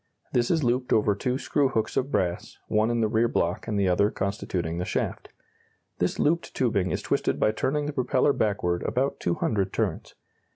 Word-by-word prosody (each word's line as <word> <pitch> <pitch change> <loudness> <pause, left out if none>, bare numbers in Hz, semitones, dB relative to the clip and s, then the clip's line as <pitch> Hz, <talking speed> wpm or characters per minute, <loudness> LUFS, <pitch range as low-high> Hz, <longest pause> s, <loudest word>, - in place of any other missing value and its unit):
This 120 -1 +2
is 160 -3 +2
looped 125 +1 0
over 105 -1 +3
two 125 +5 -1
screw 140 0 +1
hooks 110 -4 -1
of 135 +2 0
brass, 90 -1 -1
one 110 +1 +2
in 120 -1 +1
the 110 - +3
rear 110 +2 +2
block 85 -5 -1
and 105 -2 -1
the 100 - +2
other 100 +3 +3
constituting 90 -5 -3
the - - -1
shaft. - - -3 0.7
This - - 0
looped 165 +3 0
tubing 100 -7 +1
is - - -2
twisted - - 0
by 105 - +3
turning 145 +7 -1
the 150 - -3
propeller 130 +1 +2
backward 90 -7 0
about 135 +2 -1
two 85 - 0
hundred 100 -3 0
turns. - - -2
110 Hz, 195 wpm, -26 LUFS, 95-130 Hz, 0.7 s, over